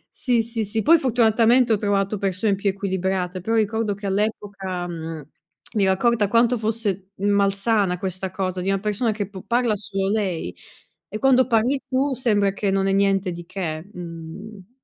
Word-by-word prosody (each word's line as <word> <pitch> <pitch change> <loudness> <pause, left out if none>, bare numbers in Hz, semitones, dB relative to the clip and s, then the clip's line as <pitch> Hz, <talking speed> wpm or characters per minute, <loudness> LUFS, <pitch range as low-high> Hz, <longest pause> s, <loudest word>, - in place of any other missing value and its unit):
Sì, 240 -3 +1
sì, 230 -1 -3
sì, 215 +2 -1
poi 330 +6 +6
fortunatamente 235 -1 +3
ho - - +4
trovato 200 0 0
persone 195 +1 0
più 200 +1 -1
equilibrate, 190 -1 -2
però 225 +6 -1
ricordo 220 -1 +1
che 205 +1 -7
all'epoca, 195 -3 -2
mhmm, 165 -2 -6 0.5
mi 205 -3 +2
ero 190 - +4
accorta 220 +2 +2
quanto 235 +3 +3
fosse 210 -4 -2
malsana 200 0 +2
questa 185 0 -4
cosa, 185 -1 -2
di 190 - -1
una 195 0 0
persona 210 +3 0
che 205 -2 -4
p 190 -2 -10
parla 235 -2 +1
solo 195 -1 -2
lei 185 - -1 0.6
e 215 - -6
quando 260 -1 +4
parli 245 +3 +2
tu 270 +2 +1
sembra 205 -6 +1
che 200 0 -1
non 195 0 +1
è - - +2
niente 195 -1 +2
di 175 -1 -8
che 170 -2 -5
mhmm 180 +4 -9
200 Hz, 175 wpm, -23 LUFS, 190-225 Hz, 0.6 s, poi